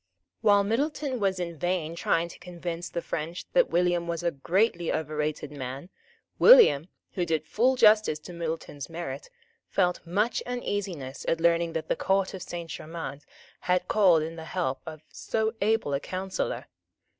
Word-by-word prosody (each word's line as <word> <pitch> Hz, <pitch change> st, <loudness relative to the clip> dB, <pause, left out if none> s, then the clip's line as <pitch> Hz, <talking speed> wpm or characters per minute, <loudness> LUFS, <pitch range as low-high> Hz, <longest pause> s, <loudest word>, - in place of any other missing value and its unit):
While 205 Hz, -1 st, +5 dB
Middleton 270 Hz, +4 st, -1 dB
was 195 Hz, -2 st, 0 dB
in 170 Hz, -3 st, -4 dB
vain 175 Hz, -2 st, -1 dB
trying 170 Hz, 0 st, +1 dB
to -, -, -12 dB
convince 175 Hz, -1 st, -6 dB
the 170 Hz, -, -4 dB
French 165 Hz, +3 st, -4 dB
that -, -, +4 dB
William 175 Hz, -1 st, +1 dB
was 170 Hz, 0 st, -3 dB
a 170 Hz, -, +1 dB
greatly 175 Hz, +4 st, +1 dB
overrated 150 Hz, -1 st, -2 dB
man, 135 Hz, +3 st, -6 dB, 0.5 s
William, 445 Hz, -, +8 dB, 0.2 s
who 180 Hz, -, -1 dB
did 160 Hz, -2 st, -1 dB
full 250 Hz, +9 st, +2 dB
justice 215 Hz, -8 st, +5 dB
to 175 Hz, -, -10 dB
Middleton's 165 Hz, -4 st, -5 dB
merit, 170 Hz, -, -6 dB, 0.4 s
felt 180 Hz, -2 st, +1 dB
much 205 Hz, +7 st, 0 dB
uneasiness 195 Hz, -, -4 dB
at 165 Hz, -, +1 dB
learning 170 Hz, 0 st, +2 dB
that 160 Hz, -, -3 dB
the -, -, +1 dB
Court 195 Hz, 0 st, +1 dB
of 190 Hz, -, -7 dB
Saint 170 Hz, -2 st, -6 dB
Germains 155 Hz, -3 st, -7 dB, 0.3 s
had 180 Hz, 0 st, 0 dB
called 180 Hz, -7 st, +4 dB
in 165 Hz, +1 st, -6 dB
the 160 Hz, -, -7 dB
help 150 Hz, -7 st, -2 dB
of 155 Hz, -1 st, -8 dB
so 220 Hz, 0 st, -1 dB
able 215 Hz, -8 st, +1 dB
a 140 Hz, -, +1 dB
counsellor. 185 Hz, +4 st, -3 dB
175 Hz, 160 wpm, -27 LUFS, 160-200 Hz, 0.5 s, William